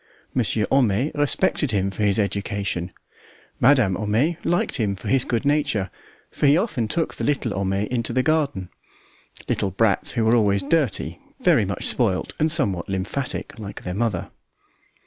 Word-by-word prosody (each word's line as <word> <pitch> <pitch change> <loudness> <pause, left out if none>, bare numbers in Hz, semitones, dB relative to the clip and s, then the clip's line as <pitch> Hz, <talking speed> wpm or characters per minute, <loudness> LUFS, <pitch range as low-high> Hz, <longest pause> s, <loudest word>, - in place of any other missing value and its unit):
Monsieur 110 -3 +1
Homais 130 +1 +2
respected 145 +1 +1
him 100 -3 0
for 100 - -6
his 100 -2 +2
education; 100 -3 -2 0.7
Madame 125 -7 +4
Homais 110 - 0
liked 175 - 0
him 105 -4 0
for 95 - -7
his 135 -1 +4
good 120 +3 -2
nature, 140 -10 +1 0.4
for 145 - +1
he 145 +3 +5
often 155 - -1
took 165 +8 -1
the - - -6
little 130 -7 0
Homais 100 +1 -1
into 120 -2 -1
the 130 +2 +1
garden 145 - 0 0.8
little 100 - 0
brats 100 +1 +2
who 115 -3 0
were 115 +2 +4
always 100 -4 +2
dirty, 140 - 0 0.2
very - - +4
much - - -4
spoilt, - - 0
and 155 +1 +3
somewhat 100 - +2
lymphatic, 100 +7 -4
like 100 -2 -8
their 90 - -4
mother. 105 -3 -2
110 Hz, 160 wpm, -23 LUFS, 100-140 Hz, 0.8 s, he